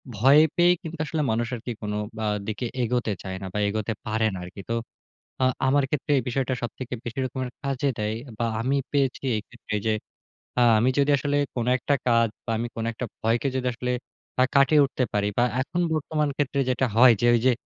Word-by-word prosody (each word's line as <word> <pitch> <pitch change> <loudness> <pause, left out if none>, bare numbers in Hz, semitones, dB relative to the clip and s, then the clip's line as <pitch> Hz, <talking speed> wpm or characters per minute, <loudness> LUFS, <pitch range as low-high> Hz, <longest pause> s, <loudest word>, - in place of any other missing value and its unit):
ভয় 135 +8 +6 0.2
পেয়েই 175 +1 +5
কিন্তু 165 -1 -7
আসলে 155 +1 -2
মানুষ 115 +1 0
আরকি 120 +1 -6
কোন 105 -1 -3 0.2
বা 110 - -2 0.2
দিকে 110 +2 -3 0.2
এগোতে 120 -1 0
চায় 95 -1 -5
না - - -5
বা 105 - -1
এগোতে 110 +2 -1
পারে 110 0 0
না - - -4
আরকি। 90 +3 -9
তো - - 0 0.7
আ - - +5 0.2
আমার 140 +1 +3
ক্ষেত্রে 150 0 -2
এই - - -1
বিষয়টা 130 +1 0
সবথেকে 120 +2 -5
বেশি 120 +2 -6
রকমের 130 0 -3
কাজে 140 0 0
দেয়। 105 0 -1 0.2
বা 120 - 0 0.2
আমি 130 +4 +1 0.2
পেয়েছি 135 -3 +1
এই - - -1
ক্ষেত্রে 105 - -5
যে 110 - +3 0.7
আ - - +7 0.2
আমি 120 +4 +3
যদি 140 +1 +3
আসলে 145 +2 0 0.2
কোন 120 -2 -1
একটা 135 +3 0
কাজ 115 -1 +4 0.2
বা 115 - -2
আমি 120 +2 -2
কোন 115 - -3
একটা 125 - -4 0.2
ভয়কে 115 +3 +1
যদি 130 -1 -1
আসলে 125 +1 -3 0.5
আ - - +7
কাটিয়ে 140 +2 +6
উঠতে 135 -1 -2
পারি, 105 0 +1
বা 120 - +4 0.2
এখন 175 +6 -2
বর্তমান 155 -1 0
ক্ষেত্রে 140 -1 0
যেটা 130 +1 +1
হয় 120 +1 +8
যে - - +3
ওই - - +3
যে 130 - +6
125 Hz, 205 wpm, -25 LUFS, 115-140 Hz, 0.7 s, হয়